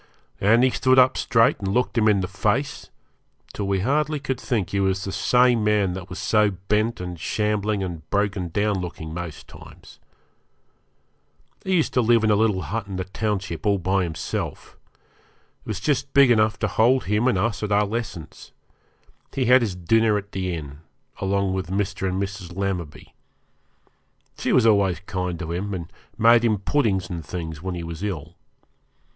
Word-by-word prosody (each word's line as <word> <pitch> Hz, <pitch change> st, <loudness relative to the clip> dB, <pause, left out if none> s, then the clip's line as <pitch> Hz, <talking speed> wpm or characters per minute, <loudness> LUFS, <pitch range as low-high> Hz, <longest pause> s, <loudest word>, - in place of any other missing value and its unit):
And 115 Hz, +5 st, +4 dB
he 130 Hz, -, +4 dB
stood 130 Hz, +1 st, +2 dB
up 130 Hz, 0 st, +6 dB
straight 115 Hz, +4 st, +2 dB
and 100 Hz, -, -4 dB
looked 125 Hz, +6 st, 0 dB
him 110 Hz, -2 st, +3 dB
in 100 Hz, -2 st, +3 dB
the 90 Hz, -, -2 dB
face, 110 Hz, +8 st, -2 dB, 0.6 s
till 100 Hz, -, -3 dB
we 100 Hz, -1 st, 0 dB
hardly 150 Hz, +6 st, 0 dB
could 130 Hz, -2 st, -3 dB
think 110 Hz, -9 st, -1 dB
he 100 Hz, -, 0 dB
was 95 Hz, -1 st, 0 dB
the 95 Hz, -, -4 dB
same 125 Hz, +3 st, +3 dB
man 105 Hz, -3 st, +2 dB
that 95 Hz, 0 st, -7 dB
was 90 Hz, -, -7 dB
so 105 Hz, -1 st, +2 dB
bent 105 Hz, +4 st, -1 dB
and 90 Hz, -2 st, -6 dB
shambling 105 Hz, +2 st, -1 dB
and 85 Hz, -4 st, -7 dB
broken 100 Hz, -3 st, 0 dB
down 100 Hz, +3 st, 0 dB
looking 80 Hz, -3 st, -6 dB
most 85 Hz, -2 st, -7 dB
times. -, -, -15 dB, 1.6 s
He 190 Hz, -1 st, 0 dB
used 165 Hz, -, +1 dB
to 125 Hz, -, +3 dB
live 115 Hz, -1 st, +3 dB
in 110 Hz, -, +3 dB
a -, -, +4 dB
little 105 Hz, -3 st, +1 dB
hut 110 Hz, -2 st, -4 dB
in 100 Hz, -, -6 dB
the 95 Hz, -, -2 dB
township 95 Hz, -4 st, -3 dB
all 100 Hz, -1 st, +3 dB
by 95 Hz, +2 st, 0 dB
himself. 80 Hz, -3 st, -5 dB, 0.9 s
It -, -, -20 dB
was 110 Hz, -3 st, -3 dB
just 140 Hz, +4 st, -1 dB
big 140 Hz, -3 st, +7 dB
enough 110 Hz, -2 st, +3 dB
to 105 Hz, -, +2 dB
hold 120 Hz, +6 st, +3 dB
him 105 Hz, +5 st, +1 dB
and 125 Hz, -, +2 dB
us 105 Hz, +1 st, -1 dB
at 105 Hz, -1 st, -3 dB
our 105 Hz, +1 st, +3 dB
lessons. 100 Hz, -7 st, -6 dB, 0.8 s
He 130 Hz, -, +1 dB
had 125 Hz, +2 st, +6 dB
his 105 Hz, -6 st, -2 dB
dinner 105 Hz, +5 st, +2 dB
at 100 Hz, 0 st, -7 dB
the 95 Hz, -2 st, -2 dB
inn, 75 Hz, -3 st, -8 dB, 0.4 s
along 100 Hz, 0 st, 0 dB
with 95 Hz, -1 st, -3 dB
Mr. 95 Hz, 0 st, -1 dB
and 95 Hz, +1 st, -2 dB
Mrs. 95 Hz, -3 st, -5 dB
Lammerby. 90 Hz, -6 st, -4 dB, 1.3 s
She -, -, -1 dB
was 125 Hz, -, +4 dB
always 100 Hz, -6 st, +3 dB
kind 90 Hz, -2 st, -3 dB
to 80 Hz, -1 st, -5 dB
him, 95 Hz, +3 st, -3 dB
and 85 Hz, -2 st, -7 dB, 0.2 s
made 115 Hz, +1 st, +5 dB
him 110 Hz, -3 st, +2 dB
puddings 100 Hz, -5 st, 0 dB
and 85 Hz, -2 st, -6 dB
things 80 Hz, -1 st, -6 dB
when 95 Hz, 0 st, -4 dB
he 85 Hz, -, -5 dB
was 85 Hz, +1 st, -7 dB
ill. 95 Hz, -8 st, -4 dB
100 Hz, 185 wpm, -23 LUFS, 90-115 Hz, 1.6 s, big